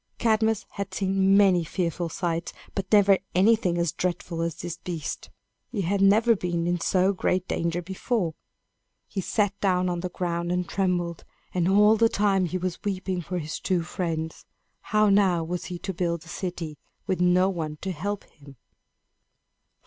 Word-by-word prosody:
Cadmus 220 -2 +2
had 200 -1 -5
seen 195 0 +3
many 190 -4 +5
fearful 170 +1 -2
sights, 170 -2 -2 0.2
but 195 -1 -4
never 200 -2 +6 0.2
anything 190 -2 +4
so 160 - -1
dreadful 175 -2 -2
as 165 -1 -1
this 175 -1 -6
beast. 170 -4 -5 0.4
He 210 - -1
had 195 +2 0
never 220 +4 +5
been 175 -3 -2
in 175 0 0
so 185 +3 +2
great 185 -1 0
danger 170 +1 -1
before. 190 -1 -1 0.7
He 195 - -3
sat 205 +1 +1
down 185 -2 +2
on 175 -1 -2
the 180 +1 -3
ground 175 -1 -2
and 180 -1 -1
trembled; 175 -3 -1 0.3
and, 180 -1 +1
all 210 +3 +5
the 230 +1 +4
time, 200 -3 +2
he 180 +2 -2
was 185 -1 -4
weeping 190 -2 -2
for 180 +2 -4
his 155 -2 -4
two 180 -3 0
friends. 165 -2 -4 0.3
How 215 0 +2
now 190 -4 +3
was 175 +1 -4
he 180 - -5
to 190 +3 -5
build 170 -2 -1
a - - -13
city, 170 -6 -5 0.3
with 185 -1 -1
no 180 +1 +4
one 160 -5 -4
to 190 - -3
help 200 +5 -3
him? 140 -2 -17
180 Hz, 170 wpm, -26 LUFS, 170-195 Hz, 0.7 s, never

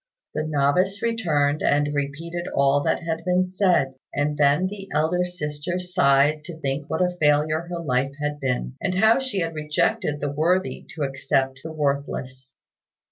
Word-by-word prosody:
The 155 - -1
novice 155 +7 +1
returned 155 -11 +1
and 145 0 +2
repeated 165 +5 -3
all 140 +1 +3
that 165 - 0
had 165 0 -3
been 180 +1 +2
said; 180 -8 +2 0.2
and 145 +1 0
then 145 +4 +3
the 195 0 -6
elder 160 +4 +1
sister 175 -1 -4
sighed 150 -4 +2
to 170 -2 -8
think 140 0 -3
what 160 +3 +1
a 180 0 0
failure 155 +2 +2
her 175 -1 -4
life 135 -3 0
had 150 0 -2
been, 130 -2 -2
and 185 -1 -1
how 220 +5 +5
she 260 -8 -2
had 165 0 -2
rejected 150 -1 0
the 145 -1 -2
worthy 175 +6 0
to 155 - -2
accept 135 -1 0
the 160 - -6
worthless. 140 -3 -3
150 Hz, 165 wpm, -24 LUFS, 140-180 Hz, 0.2 s, how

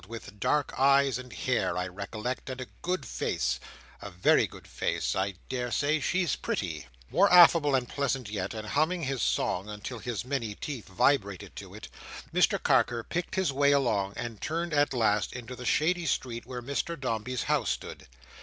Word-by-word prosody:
With 110 -2 -9
dark 145 +6 +1
eyes 135 -2 +4
and 125 -1 -10
hair, 100 -8 0
I 90 - 0
recollect, 105 +8 -5
and 130 0 -5
a 130 - -4 0.2
good 180 +1 -2
face; 60 0 -1 0.4
a 100 - -6
very 90 -1 +3
good - - -13
face! - - -1
I 95 0 -1
daresay 130 +4 0
she's 175 0 +1
pretty." 80 - -3 0.2
More 200 +2 +4
affable 165 -5 +7
and 125 -2 0
pleasant 135 -3 -1
yet, 100 0 -3
and 110 -1 -6
humming 160 +4 +1
his 135 -3 -2
song 95 +3 0
until 105 +3 -6
his 120 -1 -4
many 120 -6 -2
teeth 135 -3 -6
vibrated 100 -1 +1
to - - -9
it, - - -9 0.5
Mr - - +4
Carker 120 -1 +3
picked 175 +7 -3
his 190 -7 +1
way 140 +1 +4
along, 105 -8 +1
and 115 -3 -6
turned 165 +1 -2
at 145 0 +3
last 110 -5 +1
into 125 0 -7
the 125 - -8
shady 170 +5 +2
street 120 -3 -2
where 125 -1 -6
Mr 140 +5 -2
Dombey's 125 -1 -2
house - - +1
stood. - - -5
125 Hz, 175 wpm, -29 LUFS, 105-145 Hz, 0.5 s, affable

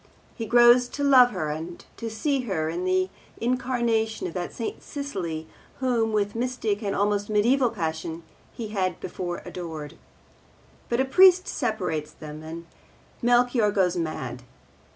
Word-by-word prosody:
He 225 - -5
grows 240 +2 +6
to 285 - -1
love 260 -3 +7
her 180 -9 -3
and 165 +3 -6
to 230 - -4
see 275 +6 0
in - - -1
her 160 -4 -1
the 185 +1 +1 0.3
incarnation 235 -3 0
of 175 - -4
that 180 -1 -3
St. 230 - -5
Cecily 180 - -4 0.3
whom, 240 -4 +1
with 205 -1 0
mystic 230 -4 -1
and 200 -2 -2
almost 205 0 0
mediaeval 240 +5 +3
passion, 160 -2 -4 0.3
he 225 -3 -6
had 185 -4 -1
before 175 -1 -5
adored. 160 -4 -7 0.9
But 235 +2 +2
a - - +1
priest 365 +6 +6
separates 180 - -2
them, 155 0 -9
and 165 +2 -8 0.6
Melchior 240 -2 +3
goes 190 -3 +2
mad. 130 -7 -3
210 Hz, 145 wpm, -26 LUFS, 170-245 Hz, 0.9 s, love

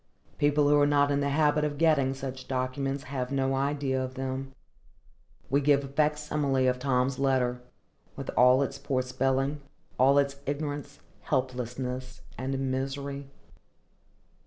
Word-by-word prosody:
People 145 0 +3
who 145 0 +5
are 145 - +4
not 145 0 +3
in 140 - +2
the 140 0 0
habit 150 +1 +2
of 145 -1 -2
getting 145 -4 +3
such 130 -1 -6
documents 135 +1 -2
have 130 -1 -4
no 135 -1 +1
idea 135 -1 0
of 130 0 -6
them. 135 0 -4 1.0
We 140 +1 +3
give 140 0 +3
a - - -6
facsimile 150 -2 0
of 125 0 +1
Tom's 130 0 0
letter, 130 -2 +1 0.5
with - - -5
all 125 +2 +6
its 135 - -5
poor 130 -2 -1
spelling, 135 +3 0 0.4
all 135 +2 +5
its 140 -1 +2
ignorance, 145 0 -4 0.2
helplessness, 130 -1 -3
and 135 +1 -2
misery. 140 +1 -4
135 Hz, 140 wpm, -28 LUFS, 130-145 Hz, 1.0 s, all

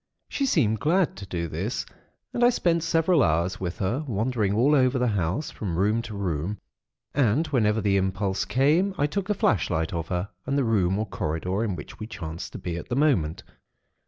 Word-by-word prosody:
She 275 - -1
seemed 110 - +2
glad 170 +3 +2
to 100 0 -8
do 85 -2 -3
this, - - -3 0.5
and 240 - +1
I 240 - +7
spent 170 -8 +1
several 165 0 +3
hours 85 +2 +1
with 90 -1 -4
her, 115 +10 -1
wandering 110 -2 0
all 130 +7 +4
over 130 -2 +3
the 125 -1 +2
house, 100 - -1
from 90 -6 -4
room 105 +5 +2
to 110 -2 -7
room; 90 +1 -2 0.6
and 135 +3 +2
whenever 110 -7 +1
the 100 -1 +2
impulse 95 0 0
came, 160 +9 +2
I 145 - +2
took 195 +6 -2
a 210 - +2
flashlight 85 - +1
of 85 -1 -3
her 90 +1 -2 0.2
and 140 - +1
the 140 - +2
room 100 -5 +2
or 110 - -1
corridor 90 +3 -2
in 105 -5 -1
which 75 - -10
we 110 - -5
chanced 85 -6 -6
to - - -5
be 85 -1 -4
at 85 - -8
the 120 - -1
moment. 125 - +1
105 Hz, 200 wpm, -26 LUFS, 90-140 Hz, 0.6 s, I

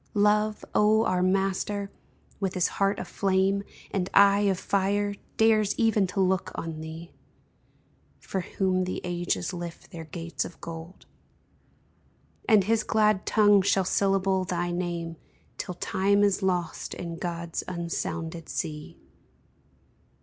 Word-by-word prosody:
Love, 210 +1 +2
O 215 +2 +4
our 180 -1 +1
master, 195 +2 0 0.5
with 195 -2 -2
his 180 - +2
heart 195 0 +1
of - - -5
flame 195 +2 +1 0.3
And 185 -2 -1
eye 200 0 +6
of 190 - +1
fire, 200 +2 0 0.2
dares 215 -2 +3
even 220 -4 +3
to 180 +2 -4
look 185 0 +1
on 160 -1 -5
thee, 160 +2 -8 1.1
For 190 - -3
whom 185 0 0
the 185 - -4
ages 175 +1 -2
lift 175 -2 -7
their 165 -1 -7
gates 165 +1 -4
of 170 - -10
gold; 165 +2 -9 1.4
And 215 -3 +6
his 225 +3 +2
glad 215 -3 +2
tongue 205 -2 +5
shall 195 -1 +2
syllable 195 0 +2
thy 175 -1 -2
name 170 -2 -3 0.4
Till 180 - -4
time 200 +3 +2
is 200 -1 +2
lost 180 -4 -1
in 170 -1 -6
God's 170 -2 -3
unsounded 170 -1 -4
sea 150 -1 -5
190 Hz, 130 wpm, -27 LUFS, 175-200 Hz, 1.4 s, eye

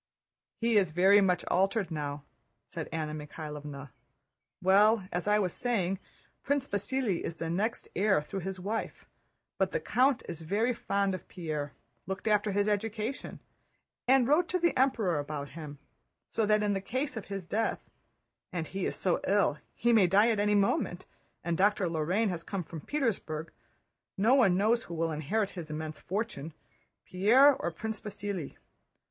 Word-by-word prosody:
"He 230 -1 +3
is 190 -4 +1
very 190 +5 +5
much 180 -3 +2
altered 195 0 +1
now," 145 -2 -4 0.4
said 165 -3 -6
Anna 155 -1 -3
Mikháylovna. 150 -2 -7 0.7
"Well, 200 +2 +4
as 175 +2 -2
I 210 0 +4
was 185 -5 0
saying, 195 -6 -1 0.4
Prince 280 -1 0
Vasíli 205 -1 -1
is 165 - -4
the 165 0 -3
next 210 +7 -1
heir 195 -1 +3
through 150 +6 -5
his 190 +1 -5
wife, 210 +5 -4 0.5
but - - +1
the - - +1
count 265 - +2
is 165 -2 -6
very 210 +9 +1
fond 200 -3 0
of 185 -1 -6
Pierre, 155 -5 -4 0.3
looked 190 +3 -4
after 210 -1 +2
his 205 +1 +1
education, 215 +4 -2 0.7
and 260 -1 +5
wrote 320 +5 +4
to 365 - +1
the 345 -1 +1
Emperor 225 - +2
about 145 -1 -5
him; 150 -1 -8 0.5
so 220 -2 +1
that 210 0 +3
in 205 -1 +1
the 195 - -1
case 255 +6 -3
of 220 - -5
his 195 -3 -5
death—and 180 -4 -5
he 195 -1 -2
is - - -3
so 180 -3 0
ill 200 -5 +3
that 150 - -18
he 235 0 +2
may 205 -5 +6
die 205 +6 +5
at 215 - 0
any 210 0 +3
moment, 195 -3 +1 0.4
and 170 -1 0
Dr. 200 -1 +3
Lorrain 170 +7 +1
has 175 -3 -3
come 185 +2 -4
from 160 -1 -8
Petersburg—no 210 - -3
one 210 -10 +5
knows 225 +4 +2
who 170 - -7
will 165 0 0
inherit 190 +8 -1
his 170 -4 -7
immense 155 0 -5
fortune, 165 -7 -4 0.5
Pierre 235 +10 +6
or 170 - -2
Prince 215 +6 -5
Vasíli. 200 -6 -5
195 Hz, 165 wpm, -30 LUFS, 165-220 Hz, 0.7 s, may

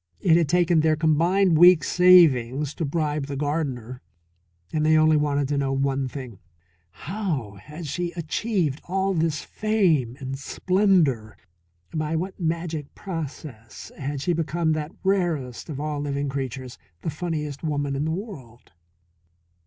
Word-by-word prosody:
It 170 -4 +4
had 165 -4 +2
taken 175 0 +3
their 155 0 +3
combined 165 +3 +3
week's 175 -4 +7
savings 150 -7 +5
to 165 - -3
bribe 150 -1 -1
the 140 - -4
gardener. 135 -5 -3 0.7
And 155 - +1
they 155 0 +4
only 155 0 +5
wanted 145 -2 +1
to 145 -1 0
know 135 -1 0
one 135 0 0
thing: 125 -6 -8 0.5
How 145 - -4
had 155 +3 -9
she 175 +4 -3
achieved 170 - -1
all 190 +2 0
this 160 -3 0
fame 170 - +1
and 135 0 -5
splendour, 155 - +1 0.6
by 155 0 -1
what 185 +5 -4
magic 165 -3 -3
process 150 - -7
had 140 0 -4
she 175 +4 +1
become 165 0 0
that 155 0 -2
rarest 170 -12 -1
of 145 -3 -5
all 150 -1 -3
living 140 -1 -2
creatures, 130 -2 -5 0.2
the 160 - -2
funniest 150 -3 -4
woman 145 -3 -1
in 140 +2 -1
the - - -1
world? 160 - -8
155 Hz, 145 wpm, -24 LUFS, 140-170 Hz, 0.7 s, week's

